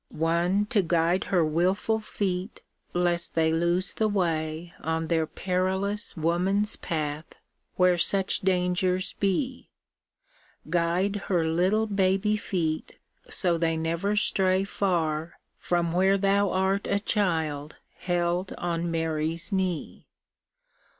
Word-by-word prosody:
One 170 +5 +1
to 210 - +4
guide 170 +1 +1
her 175 -4 +2
wilful 185 +8 +1
feet 195 -2 -3 0.3
lest 175 -1 0
they 160 -1 +2
lose 170 +3 +1
the 220 - +1
way 165 -4 -1
On 160 0 -2
their 160 -2 +1
perilous 190 +4 -2
woman's 185 +6 +1
path, 155 -1 -4 0.4
where 180 -1 +3
such 195 +2 +2
dangers 185 0 0
be; 250 +7 -1 1.0
Guide 175 +4 +1
her 175 -4 +1
little 185 +7 +2
baby 195 0 +1
feet 165 -7 -3 0.3
so 175 -3 +2
they 165 -1 +1
never 170 +6 -1
stray 190 -2 +2
Far 170 -5 -1 0.2
from 175 -1 0
where 190 +3 +3
Thou 200 0 +2
art 190 +2 0
a - - +1
Child 160 -8 -1 0.2
held 175 +1 -1
on 170 0 -2
Mary's 165 +1 0
knee. 185 -4 -2
180 Hz, 115 wpm, -27 LUFS, 165-195 Hz, 1.0 s, to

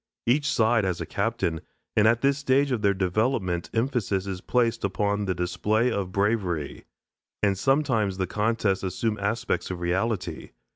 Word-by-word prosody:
Each 140 +4 +2
side 110 -1 +3
has 95 -3 -1
a - - -3
captain, 100 -6 -1 0.3
and 110 0 +5
at 115 +1 +3
this 140 0 +2
stage 140 0 +2
of 120 -4 0
their 100 -1 +3
development 95 -2 0
emphasis 115 -5 0
is 95 -2 -5
placed 120 -2 +1
upon 100 +1 0
the 95 -2 -1
display 105 +7 0
of 95 -4 -2
bravery. 95 -7 -1 0.6
And 100 -1 +3
sometimes 115 -5 +1
the 95 - 0
contests 105 0 0
assume 105 +3 -2
aspects 105 +3 -1
of 90 -2 -4
reality. 95 +4 -2
105 Hz, 155 wpm, -26 LUFS, 95-115 Hz, 0.6 s, and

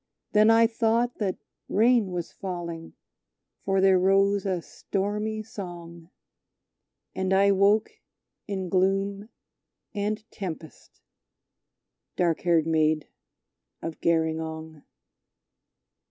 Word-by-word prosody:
Then 215 +1 +5
I 225 0 +6
thought 230 +1 0
that 195 -4 -1 0.3
rain 230 0 +3
was 175 -2 -4
falling, 170 -3 -6 0.7
for 195 0 +1
there 190 -1 +5
rose 195 +1 +3
a 185 -2 0
stormy 210 +2 -3
song, 175 -5 -9 1.0
And 190 0 -2
I 200 +1 +5
woke 200 +2 +3 0.6
in 190 -2 -3
gloom 195 +3 0 0.6
and 210 +1 -2
tempest, 165 - -8 1.1
dark 170 -3 +1
haired 170 -3 +2
Maid 155 -1 +1 0.7
of 165 -1 -6
Gerringong! 160 -1 -1
190 Hz, 95 wpm, -26 LUFS, 170-205 Hz, 1.1 s, I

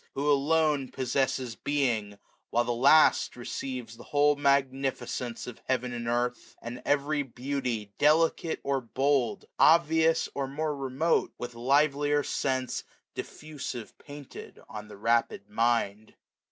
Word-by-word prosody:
who 145 +2 +1
alone 150 -1 +2
Possesses 130 -2 -1
being; 115 -9 -1 0.3
while 120 - +2
the 120 - -2
last 140 +6 +5
receives 120 -1 -6
The 120 - -12
whole 145 0 +3
magnificence 135 -3 -1
of 125 - -9
heaven 125 -1 -1
and 120 -1 -5
earth; 120 +1 -2
And 120 +2 -7
every 145 +1 +1
beauty, 125 -5 -4
delicate 160 +2 +3
or 140 -1 0
bold, 130 0 0
Obvious 160 0 +4
or 140 -1 -2
more 150 +2 -2
remote, 135 +4 0
with 120 0 -6
livelier 145 +4 +2
sense, 130 -2 -1
X750 - - -33
Diffusive 145 -7 -7
painted 145 -2 -11
on 105 -1 -8
the 105 - -12
rapid 115 -2 0
mind. 115 -2 0
135 Hz, 125 wpm, -28 LUFS, 120-145 Hz, 0.3 s, last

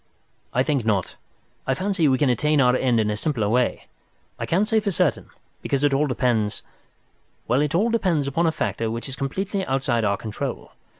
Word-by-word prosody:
"I 125 - +2
think 140 -4 0
not. 105 -4 0 0.5
I 135 - +2
fancy 190 0 +1
we 130 -2 +3
can 135 -1 +3
attain 150 +5 +2
our 125 -1 +4
end 125 -3 +2
in 105 -1 +1
a - - -1
simpler 115 -2 -1
way. 125 +3 0 0.5
I - - -3
can't 195 +5 +2
say 220 -1 +3
for 210 -1 -2
certain, 185 - 0 0.3
because 140 0 -1
it 145 -1 +3
all 145 +2 +2
depends—well, 120 +1 -3
it 150 +2 0
all 220 +6 +2
depends 180 -10 +1
upon 165 +5 +1
a - - +3
factor 115 -7 -2
which 115 +3 -4
is 135 - -5
completely 190 +9 -2
outside 130 -6 0
our 100 -1 +1
control. 110 -2 -5
135 Hz, 190 wpm, -23 LUFS, 120-160 Hz, 0.5 s, our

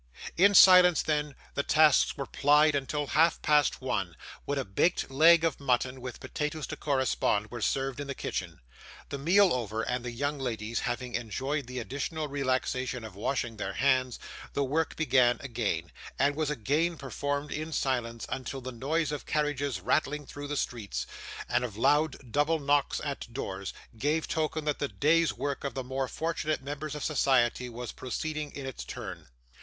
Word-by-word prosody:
In 200 +3 +5
silence, 180 -3 +8
then, 150 -2 -1 0.2
the - - 0
tasks 155 0 +4
were 140 - -3
plied 150 +3 +4
until 145 +1 -1
half 160 +4 +3
past 150 -2 +3
one, 95 -9 -2 0.3
when 145 - -1
a 135 - -1
baked 135 - +1
leg 160 +4 +6
of 165 -4 0
mutton, 130 -1 0
with 125 -1 -7
potatoes 150 0 -3
to - - -6
correspond, 130 -6 0
were 120 -2 -6
served 135 +3 -1
in 145 - -4
the 140 - -4
kitchen. - - -4 0.5
The 140 - -4
meal 185 +6 +5
over, 115 -3 -2
and 125 0 -2
the 125 - -4
young 140 +5 -2
ladies 115 -3 -2
having 125 0 -3
enjoyed 130 +4 -2
the 125 0 -7
additional 145 +5 -3
relaxation 130 -2 -1
of 110 -3 -8
washing 115 +2 -2
their 100 -2 -3
hands, 130 -2 +2 0.4
the 140 - +1
work 155 +4 0
began 130 -6 +3
again, 110 -10 -2 0.3
and 140 +1 +2
was 155 -1 -1
again 150 +6 0
performed 145 +1 -3
in 155 +2 -4
silence, 120 -5 -1
until 135 +1 -4
the 130 0 -6
noise 145 +6 -1
of 150 - -5
carriages 145 - -1
rattling 145 +7 0
through 145 +2 -7
the 145 0 -3
streets, 115 -6 -3 0.4
and - - +1
of 110 -5 -5
loud 145 -1 +1
double 150 +4 +2
knocks 145 -1 +1
at 140 -5 -5
doors, 95 -3 -4 0.2
gave 150 +7 0
token 155 -1 -1
that 150 -1 -1
the 145 - 0
day's 160 +4 +2
work 140 -1 -4
of 140 -4 -4
the 130 - -3
more 130 +1 -2
fortunate 155 -1 -2
members 145 +2 -5
of 150 - -5
society 125 -4 +2
was 120 0 -6
proceeding 150 +4 -4
in 140 - -6
its 130 - -6
turn. - - -7
140 Hz, 175 wpm, -29 LUFS, 125-150 Hz, 0.5 s, silence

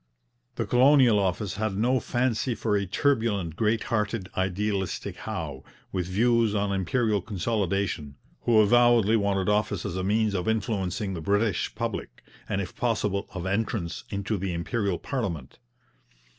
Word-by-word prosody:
The - - -1
Colonial 125 -3 +5
Office 95 0 -1
had 105 -2 -1
no 125 +4 +2
fancy 120 0 0
for 110 -2 0
a 100 -1 0
turbulent, 105 - 0
great 110 +3 +1
hearted, 105 -3 -1
idealistic 95 +1 -1
Howe, 75 -5 -5 0.3
with 90 -2 -2
views 115 +2 +2
on 100 -1 0
Imperial 105 +2 +1
consolidation, 100 -7 -2 0.3
who 115 -2 +3
avowedly 115 0 +5
wanted 100 -3 +1
office 105 -2 0
as 85 - -3
a 95 - -2
means 105 +2 +1
of 90 0 -2
influencing 105 -3 -1
the 85 - -5
British 100 +2 0
public, - - -4 0.3
and 95 - 0
if 95 - -7
possible 105 -4 -1
of 90 -1 -4
entrance 95 -4 -2
into 100 +1 -2
the 95 -1 -2
Imperial 95 +2 -1
parliament. 90 - -4
100 Hz, 145 wpm, -27 LUFS, 95-115 Hz, 0.3 s, Colonial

